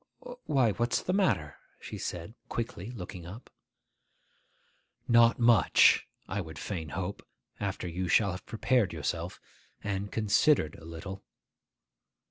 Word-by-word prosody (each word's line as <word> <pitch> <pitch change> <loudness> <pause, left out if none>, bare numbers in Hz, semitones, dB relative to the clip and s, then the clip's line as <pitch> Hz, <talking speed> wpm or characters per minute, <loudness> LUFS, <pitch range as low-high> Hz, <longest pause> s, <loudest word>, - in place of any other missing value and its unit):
'Why, 130 -6 +3
what's 120 +3 0
the 185 - -1
matter?' 100 - +1 0.2
she - - -7
said 85 +4 -5 0.2
quickly, 115 -4 -4
looking 90 -6 -8
up. 105 +8 -10 1.6
'Not 115 -1 +6
much, 115 -3 +5 0.2
I 100 - -2
would 80 -3 -9
fain 80 -4 -4
hope, 95 +5 -4 0.4
after 100 -2 -3
you 90 +2 -3
shall 100 +3 +4
have 90 +1 -8
prepared 115 -3 +1
yourself, 85 +3 -3 0.4
and 100 0 -3
considered 105 - +3
a 80 - -13
little. 90 +4 -7
100 Hz, 120 wpm, -30 LUFS, 85-115 Hz, 1.6 s, Not